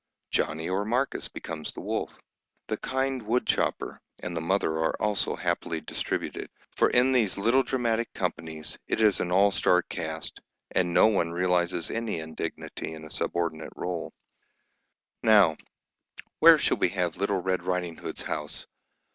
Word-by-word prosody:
Johnny 80 +1 0
or 95 +2 0
Marcus 125 +6 0
becomes 80 -2 -6
the - - -8
wolf. - - -3 0.5
The - - 0
kind 130 0 -1
woodchopper 115 +3 0 0.2
and 90 - -4
the 85 - -1
mother 95 +1 +1
are 80 - 0
also 105 -1 0
happily 80 -1 -1
distributed, - - -4 0.2
for - - +3
in 125 +2 +4
these 115 -7 +2
little 115 +7 +4
dramatic 120 -3 0
companies 80 -4 -4
it - - -1
is 110 -3 +4
an 90 - -1
all 100 +2 +5
star 90 -3 +3
cast, - - -5 0.3
and 90 -1 +1
no - - +6
one 100 -6 +2
realises 90 -1 +1
any 115 -6 -2
indignity 80 0 -5
in 80 - -10
a 75 - -10
subordinate 85 -2 -2
rôle. 90 -2 -3 1.1
"Now, 105 -8 +6 0.8
where - - +9
shall - - +2
we - - +2
have 90 -3 -1
little 100 0 +1
Red 95 -1 0
Riding 90 -2 -2
Hood's - - -6
house? 75 -1 -4
90 Hz, 150 wpm, -27 LUFS, 85-110 Hz, 1.1 s, where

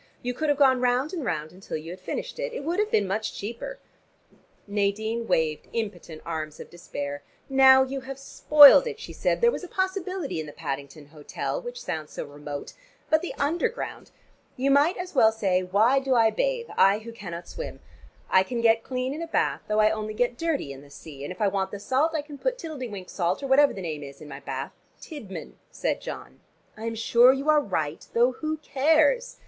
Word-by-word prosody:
"You 250 0 -2
could 310 +4 -2
have 290 - +2
gone 260 -3 +4
round 250 +6 +1
and 335 -5 -3
round 155 -8 -3
until 185 -2 -6
you 160 +2 -8
had 185 - -9
finished. - - -5
It - - -4
would 340 +6 -1
have 425 0 +1
been 205 - +2
much 215 +3 -2
cheaper." 235 - -6 0.9
Nadine 215 +3 -1
waved 160 -4 0
impotent 180 -8 -5
arms 155 -2 -5
of - - -10
despair. 145 -4 -6 0.3
"Now 265 0 +7
you 270 +1 -4
have 265 +1 -7
spoiled 290 - +7
it," 450 -2 -5
she - - -8
said. - - 0
"There 475 0 +5
was - - -5
a - - -6
possibility 375 - -2
in 155 - -5
the 145 - -9
Paddington 140 -1 -6
hotel, 150 - -4
which 485 0 -7
sounds 155 - -5
so - - -5
remote. 145 0 -8 0.4
But 315 0 +4
the 360 - -5
Underground! 345 +12 -2 0.5
You 270 +2 +1
might 290 +6 +4
as 360 0 -6
well 220 -6 +5
say, 195 -5 +1
why 210 +9 +3
do 270 -1 0
I 225 -2 +5
bathe, - - -1
I 195 +1 +5
who 225 +2 -9
cannot 175 -6 -8
swim? - - -7 0.5
I 185 - +5
can 235 +5 -3
get 230 -1 +4
clean 255 +2 -3
in 310 - -6
a 335 - -4
bath, - - 0
though 215 0 +2
I 215 0 +4
only 215 0 -4
get 245 +1 +1
dirty 290 - -2
in 135 - -12
the 145 - -16
sea, 140 0 -11
and 145 - -5
if 180 - -9
I 210 - +4
want 195 -1 -1
the 205 - -7
salt 285 +9 +1
I 300 - -1
can 290 -2 -11
put - - -1
Tiddle 315 - -7
de 255 - -4
wink 195 -4 -8
salt 180 +6 -1
or - - -2
whatever 280 +2 +5
the 190 - -7
name 155 -3 -4
is 140 -1 -10
in 155 - -11
my 140 -1 -8
bath - - -5 0.2
" - - -38
"Tidman," 255 - -9
said - - -2
John. - - -8 0.4
"I 220 - -8
am 230 0 -2
sure 235 +2 +5
you 275 +3 -2
are 300 -1 +4
right, 160 - -3
though 240 +2 +4
who 310 +4 -3
cares? 315 - +2
235 Hz, 220 wpm, -26 LUFS, 185-295 Hz, 0.9 s, Now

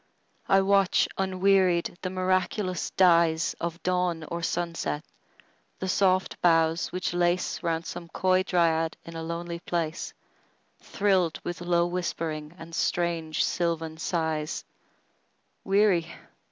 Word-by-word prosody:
I 195 0 +6
watch, 195 -1 +3
unwearied, 190 -2 +2
the 185 - -2
miraculous 185 0 -1
dyesOf 170 -1 +2
dawn 180 -2 0
or 170 0 -3
sunset; 165 -3 -2 0.7
the 190 - -4
soft 185 0 +1
boughs 165 -1 +3
which 180 0 -2
laceRound 175 -1 0
some 170 - -7
coy 185 +2 +2
dryad 165 -3 +1
in 165 - -9
a 165 - -4
lonely 170 +1 -4
place, 170 -1 -3 0.6
Thrilled 190 -5 +1
with 175 0 -5
low 175 -1 +2
whispering 165 -3 -3
and 165 0 -11
strange 165 -2 0
sylvan 165 -2 -1
sighs:Weary? 170 +3 -2
175 Hz, 105 wpm, -27 LUFS, 165-185 Hz, 0.7 s, I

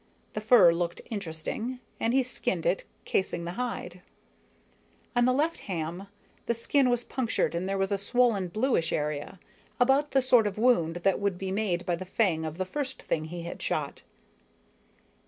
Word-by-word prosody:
The 215 - -3
fur 215 -6 +7
looked 170 0 -2
interesting, 205 +6 -4 0.2
and 230 - +1
he 265 +1 +3
skinned 255 - -2
it - - +2
out, - - -23 0.2
casing 180 -2 -1
the 170 - -3
hide. 185 -5 -4 1.1
On 240 0 +4
the 255 - +4
left 305 +6 +1
ham, 175 +1 -4 0.4
the 235 - +1
skin 255 +3 +2
was 245 -1 +1
punctured 245 -8 -1
and 175 +3 -2
there 195 - 0
was 195 +1 0
a 200 - +1
swollen, 215 -2 +2
bluish 215 -3 +1
area 150 +4 -2 0.4
about 270 +4 +4
the 270 - +3
sort 245 -4 +5
of 205 - -4
wound 210 -9 +3
that 195 -1 +3
would 200 -3 0
be 190 0 -4
made 190 -4 -1
by 175 - +1
the 180 - -6
fang 180 -5 +1
of 155 +1 -5
the 185 - -1
first 265 +6 -4
thing 155 -1 -2
he 170 +1 -6
had 170 - -7
shot. - - -2
200 Hz, 180 wpm, -28 LUFS, 175-245 Hz, 1.1 s, fur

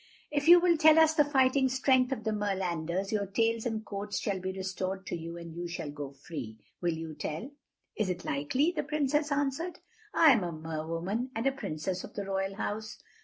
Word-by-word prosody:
"If 290 0 0
you 350 +1 +10
will 345 -1 +3
tell 310 0 +7
us 320 -1 +6
the 310 -2 +5
fighting 265 -2 +3
strength 260 0 +3
of 250 -4 -2
the 220 - 0
Merlanders, 190 -3 -1
your 205 -2 0
tails 225 +3 +1
and 220 -1 -3
coats 200 0 -4
shall 195 -2 -1
be 185 +1 -3
restored 190 0 -4
to - - -3
you 170 0 -6
and 170 -1 -8
you 175 +1 -4
shall 165 -3 -5
go 145 -1 -6
free. 135 -5 -8 0.2
Will 170 -2 +1
you 160 -1 -6
tell?" 160 - -5 0.4
"Is 210 -3 0
it 180 0 -3
likely?" 255 - +1
the 305 - +1
Princess 295 0 0
answered. 285 +5 -1 0.3
"I 320 -3 +7
am 230 -7 +3
a 175 - -2
Mer 160 0 -5
woman, 190 +10 -2
and 225 +3 -2
a 270 - +4
Princess 185 - -4
of - - -10
the 200 - -3
Royal 195 0 -2
House. 215 +1 -4
200 Hz, 210 wpm, -30 LUFS, 170-270 Hz, 0.4 s, you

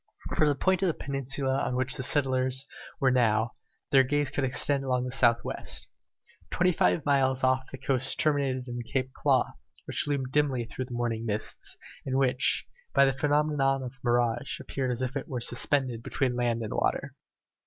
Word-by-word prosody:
From 155 - +3
the 145 - +2
point 190 +6 +1
of 190 - +2
the 165 - 0
peninsula 135 0 -1
on 125 - -1
which 130 +1 +1
the 135 - -3
settlers 130 -1 +1 0.3
now 120 -5 +3
were 115 - -6 0.4
their 135 -2 +6
gaze 145 +2 0
could 145 - -1
extend 135 +2 +2
along 125 -1 0
the 125 - -4
south 120 -3 +3
west. - - -5 0.6
Twenty 180 +1 +2
five 160 -2 +1
miles 135 -2 +2
off 130 0 +2
the 135 - -7
coast 130 -1 0
terminated 135 -4 +1
in 120 0 -5
the 130 +2 -2
Claw - - +2
Cape, - - -15 0.3
which - - -2
loomed 135 -3 -1
dimly 135 -5 +1
through 130 +3 -5
the 125 -1 -7
morning 115 -2 -2
mists, 105 0 -4 0.3
and 130 0 -1
which, 130 -1 +2 0.3
by 140 - +7
the 135 - +2
phenomenon 145 -1 +1
of 125 - -5
the 135 - -19
mirage, 120 +1 0
appeared 130 -2 -3
as 125 +1 -1
if 130 +2 -3 0.3
suspended 125 -1 0
between 125 +1 -1
land 120 -1 0
and 110 - -4
water. - - -1
130 Hz, 185 wpm, -28 LUFS, 125-140 Hz, 0.6 s, by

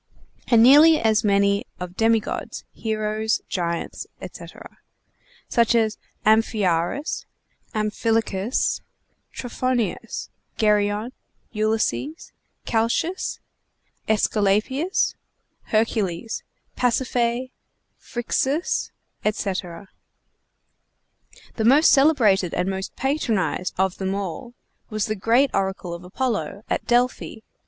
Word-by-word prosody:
and 230 -2 +6
nearly 300 +5 +8
as 220 0 +2
many 200 0 +3 0.2
of 180 0 -6
demi 225 +1 +3
gods, 215 - -6
heroes, 215 0 -1
giants, 170 -2 -3
etc., - - -11 0.7
such 235 0 +3
as 220 -2 +1 0.3
Amphiaraus, 215 - +1 0.5
Amphilochus, 215 0 0 0.5
Trophonius, 245 -2 -2 0.3
Geryon, 210 +1 +1 0.4
Ulysses, 220 +8 -1 0.3
Calchas, 235 +11 0 0.7
Æsculapius, 220 - +1 0.5
Hercules, 215 -3 -1 0.3
Pasiphae, 245 0 0 0.5
Phryxus, 270 +6 -1 0.3
etc. 195 -3 -3 1.7
The 220 - 0
most 280 +7 +6
celebrated 230 - +4
and 180 - 0
most 190 0 -4
patronized 235 - -1
of 190 0 0
them 190 0 -1
all 200 +5 -5 0.3
was 215 -1 -1
the 215 - -1
great 235 +7 +3
oracle 190 -2 -2
of 170 +1 -8
Apollo, 210 +1 -3
at - - -1
Delphi. 245 -2 +1
220 Hz, 85 wpm, -23 LUFS, 200-245 Hz, 1.7 s, nearly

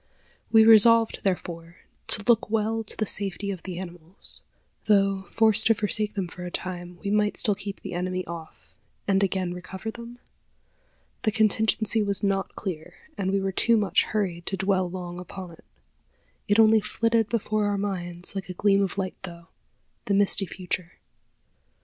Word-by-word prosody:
We 220 -1 +7
resolved, 225 +1 +6
therefore, 170 -3 -3 0.3
to 205 - +4
look 230 -2 +3
well 225 +1 0
to 210 - -3
the 215 - 0
safety 200 0 -1
of 185 -3 -6
the 185 -2 -7
animals. 175 0 -7 0.4
Though, 195 -2 +2
forced 220 -1 +4
to 225 - +4
forsake 210 -1 0
them 195 -3 -2
for 180 +1 -10
a 180 - -5
time, 175 -1 -6
we 200 - -2
might 210 0 +1
still 210 - +4
keep 200 0 -6
the - - -7
enemy 185 +1 -2
off, 160 - -10 0.3
and 195 -1 +3
again 185 -2 0
recover 190 +4 -7
them? 235 +1 -10 1.0
The 215 - +1
contingency 220 0 +2
was 200 -1 +1
not 195 -1 -1
clear, 170 -6 -6 0.2
and 190 -1 -2
we 195 +1 +1
were 195 0 -1
too 230 +4 +3
much 200 -3 +2
hurried 180 -5 -3
to 195 - -1
dwell 190 -2 +1
long 175 -1 -6
upon 180 0 -9
it. 165 - -17 0.8
It 205 0 +3
only 220 0 +6
flitted 230 0 0
before 215 -2 0
our 205 0 0
minds 180 -3 -3
like 195 -1 -5
a 180 - -6
gleam 200 +1 +3
of 195 0 -2
light 190 -1 -3
through, 170 -3 -9 0.6
the 200 - +1
misty 200 -1 +2
future. 180 -1 -5
195 Hz, 170 wpm, -25 LUFS, 180-215 Hz, 1.0 s, We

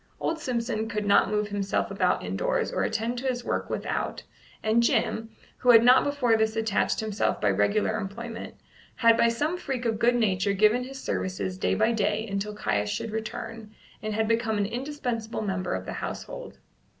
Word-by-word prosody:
Old 330 - -1
Simpson 235 -5 -2
could 210 -1 -2
not 200 0 +4
move 210 0 0
himself 200 -1 -1
about - - +1
indoors - - -1
or - - -1
attend 235 +2 -1
to 265 - -3
his 245 -1 -1
work - - -2
without, - - -3 0.4
and 220 +2 +3
Jim, 225 -1 +1 0.3
who 250 - 0
had 230 -1 +9
not 250 +2 +7
before 280 -5 +2
this 220 0 +1
attached 225 -2 +1
himself 215 -2 -1
by - - +2
regular 215 +1 +1
employment, 225 +3 -6 0.4
had 230 -1 +5
by 235 - +4
some 295 +9 0
freak 260 -6 -3
of 225 -2 0
good 240 +1 +4
nature 200 -4 +1
given 215 +5 +3
his 270 +1 -8
services 185 -5 -2
day - - +1
by 220 +2 +3
day 215 0 0
until 205 +1 -3
Caius 105 - -1
should 160 - -3
return, 220 0 -6 0.3
and 215 -1 -3
had 220 0 +1
become 225 -1 +1
an 205 - +1
indispensable 240 -2 -3
member 185 - -2
of 95 0 -5
the - - -5
household. - - -6
220 Hz, 185 wpm, -27 LUFS, 210-240 Hz, 0.4 s, had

